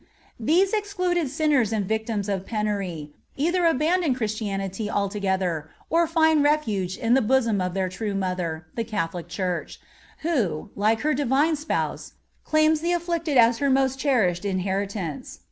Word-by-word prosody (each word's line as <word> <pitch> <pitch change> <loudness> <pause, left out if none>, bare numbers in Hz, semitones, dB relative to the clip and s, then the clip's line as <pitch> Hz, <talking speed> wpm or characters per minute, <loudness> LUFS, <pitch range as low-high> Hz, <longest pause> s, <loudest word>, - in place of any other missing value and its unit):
These 350 - +2
excluded 365 -7 0
sinners 285 -6 +2
and 215 -3 0
victims 220 -1 -2
of 195 -2 -2
penury 200 -8 -3 0.3
either 340 +4 +2
abandon 325 -1 +2
Christianity 210 -3 -3
altogether, 190 -6 -1 0.2
or 335 +1 +3
find 320 -2 +3
refuge 215 -12 0
in 230 +1 +1
the 265 - +5
bosom 230 -4 +2
of 180 0 -2
their 190 -1 0
true 200 +2 -4
Mother, 180 -4 -2
the 230 - -2
Catholic 175 -6 -3
Church, 180 0 -3 0.4
who, 215 - -1
like 215 +2 +1
her 305 +1 +1
Divine 285 +4 +2
Spouse, 300 +1 -3 0.3
claims 310 0 +3
the 345 +1 +1
afflicted 335 -4 -1
as 230 -1 +5
her 280 - +1
most 265 0 +2
cherished 215 -12 +1
inheritance. 195 -3 -3
225 Hz, 145 wpm, -24 LUFS, 195-305 Hz, 0.4 s, the